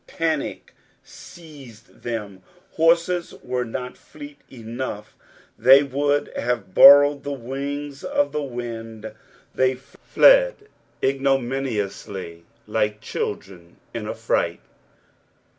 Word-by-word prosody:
Panic 160 -3 -3 0.3
seized 135 -9 -15
them, 105 -5 -5 0.3
horses 170 +2 +1
were 125 0 -2
not 125 +2 -6
fleet 145 -1 -13
enough; 115 -3 -7 0.4
they 135 +2 +7
would 145 +1 -1
have 120 -5 -3
borrowed 145 +3 +8
the 145 - -4
wings 140 +2 -6
of 285 0 0
the 150 - -2
wind. 115 -4 -7 0.4
They 130 0 +1
fled - - +3 0.5
ignominiously, 120 -10 -2 0.2
like 105 -1 -1
children 95 -5 -6 0.2
in 115 -2 -5
a - - -4
fright. 100 -6 -1
130 Hz, 95 wpm, -22 LUFS, 110-145 Hz, 0.5 s, borrowed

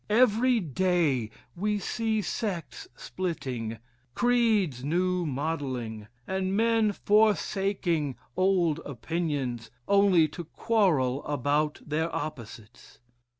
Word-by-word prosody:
Every 240 +2 +4
day 165 - +1 0.3
we 210 +3 0
see 220 +2 -1
sects 215 - -4
splitting, 135 - -4 0.4
creeds 220 - +2
new 180 +3 0
modelling, 130 -7 -3 0.2
and 190 +1 -1
men 225 -1 +3
forsaking 195 - +1 0.2
old 180 -4 +2
opinions 140 -4 -3 0.2
only 200 -5 +5
to 170 +3 -7
quarrel 155 - +1
about 145 +2 0
their 160 +2 -1
opposites. 115 -6 -8
170 Hz, 90 wpm, -28 LUFS, 140-205 Hz, 0.4 s, only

